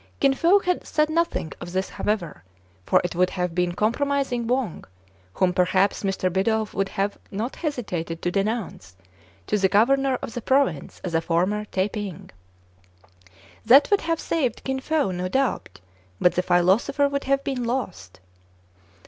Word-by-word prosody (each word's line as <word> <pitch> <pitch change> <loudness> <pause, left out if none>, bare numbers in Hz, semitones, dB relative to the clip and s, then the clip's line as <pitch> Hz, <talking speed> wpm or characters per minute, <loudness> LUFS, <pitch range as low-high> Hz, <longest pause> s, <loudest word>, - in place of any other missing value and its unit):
Kin 275 -1 +4
Fo 345 +8 +4 0.2
said 305 0 0
nothing 335 - -1
of 175 0 -7
this 190 +1 -1
however; 190 - -3 0.4
for - - +5
it 175 - -3
would 180 +1 +2
have 180 -2 -2
been 180 0 0
compromising 245 +3 0
Wang, 250 -7 -1 0.5
whom 180 -1 +2
perhaps 185 +2 +2
Mr. 190 -2 -1
Bidulph 220 +3 0
would 195 0 -1 0.4
not 220 +6 -4
have - - -14
hesitated 185 - -3
to 175 - 0
denounce 195 - -3 0.5
to 210 - 0
the 190 -1 +3
governor 265 +6 +3
of 230 - -5
the 240 - -4
province 260 - 0
as 180 - -4
a 165 - +2
former 185 +6 0
Tai 195 -1 -1
ping. 205 -6 -6 1.3
That 270 - +6
would 405 - +4
have 330 0 -1
saved 265 -9 -1
Kin 265 0 -2
Fo, 295 -5 0
no 180 0 -3
doubt; 250 - -1 0.4
but 180 - +4
the 180 - +1
philosopher 190 +12 +2
would 280 0 -3
have 275 +1 +1
been 260 -3 -2
lost. 190 - -4
210 Hz, 155 wpm, -24 LUFS, 180-270 Hz, 1.3 s, That